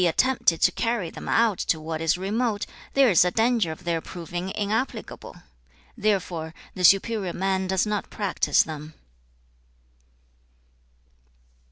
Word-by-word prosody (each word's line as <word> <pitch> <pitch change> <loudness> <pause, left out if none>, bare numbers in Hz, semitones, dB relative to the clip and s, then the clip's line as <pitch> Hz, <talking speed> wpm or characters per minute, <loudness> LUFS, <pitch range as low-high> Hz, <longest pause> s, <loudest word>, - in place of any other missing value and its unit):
attempted 235 -2 +2
to - - +4
carry 230 -7 -2
them - - -8
out 225 -4 +2
to 160 - 0
what 160 0 -5
is 165 +2 +2
remote, 210 +3 -1 0.3
there 270 -4 +5
is 175 - +6
a 180 - +2
danger 225 -3 +1
of 160 - -9
their 170 -2 -1
proving 175 +2 -6
inapplicable. 215 +5 -3 0.6
Therefore, 185 -7 -1 0.2
the 185 - -5
superior 195 +1 +3
man 190 0 -1
does 190 +1 +1
not 210 -1 -2
practise 200 -3 +1
them.' 155 0 -8
190 Hz, 130 wpm, -25 LUFS, 170-220 Hz, 0.6 s, is